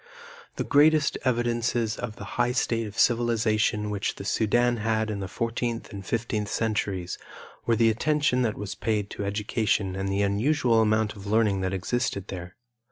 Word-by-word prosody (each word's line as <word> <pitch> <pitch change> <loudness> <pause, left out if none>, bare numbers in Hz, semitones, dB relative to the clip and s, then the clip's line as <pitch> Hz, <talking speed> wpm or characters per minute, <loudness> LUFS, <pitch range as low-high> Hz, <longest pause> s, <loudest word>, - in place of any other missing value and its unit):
The - - -2
greatest 150 0 +4
evidences 120 -2 0
of 110 -3 -5
the - - -9 0.2
high 120 +1 +1
state 115 -2 0
of 105 +2 -10
civilization 110 -3 +2
which 100 -1 -2
the 100 - -8
Sudan 120 +3 +2
had 110 0 0
in 100 - -3
the 95 - -4
fourteenth 115 +3 -3
and 100 -1 -6
fifteenth 110 0 -2
centuries 100 -5 -2 0.5
were 115 - +4
the 115 0 +4
attention 145 +2 +1
that 110 -4 0
was 105 -1 -4
paid 105 -2 -2
to - - -4
education 105 -1 0
and 95 0 -2
the 100 +1 +1
unusual 115 +3 +2
amount 110 0 +1
of 100 0 -10
learning 105 -2 +2
that 95 0 -1
existed 100 0 -2
there. 90 -1 -7
110 Hz, 165 wpm, -26 LUFS, 100-120 Hz, 0.5 s, greatest